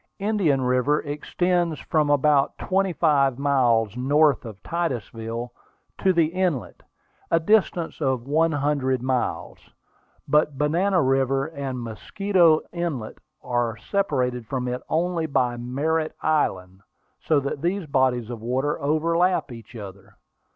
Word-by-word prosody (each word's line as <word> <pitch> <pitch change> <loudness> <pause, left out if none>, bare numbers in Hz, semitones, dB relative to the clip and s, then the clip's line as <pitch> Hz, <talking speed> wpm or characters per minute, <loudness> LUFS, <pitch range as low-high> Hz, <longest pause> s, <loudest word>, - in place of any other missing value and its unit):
Indian 195 -10 +1
River 125 +4 +2
extends 170 +3 -1
from 155 -2 0
about 145 -1 +3
twenty 195 0 0
five 140 -6 +2
miles 120 -6 +2
north 140 +2 +2
of 110 -3 -10
Titusville 120 - -4 0.5
to 190 - +3
the 170 -3 +3
inlet, 170 -5 -2 0.5
a 165 - +3
distance 175 -3 +1
of 130 -4 0
one 160 +4 +2
hundred 140 -4 0
miles. 130 -1 -2 0.7
But 150 -2 +2
Banana 175 +5 +2
River 135 +1 +1
and 140 -5 -5
Mosquito 170 - +2
Inlet 165 -10 -4 0.2
are 120 -2 -1
separated 125 - -1
from 125 -1 -3
it 125 +1 -3
only 165 0 0
by 125 -4 +1
Merritt's 150 +7 -2
Island, 95 -12 0 0.4
so 155 -3 +2
that 140 0 -4
these 180 +2 -1
bodies 130 -4 +1
of 115 -2 -7
water 130 +6 -1
overlap 165 +3 +1
each 115 0 -11
other. 100 -3 -10
140 Hz, 125 wpm, -24 LUFS, 125-165 Hz, 0.7 s, about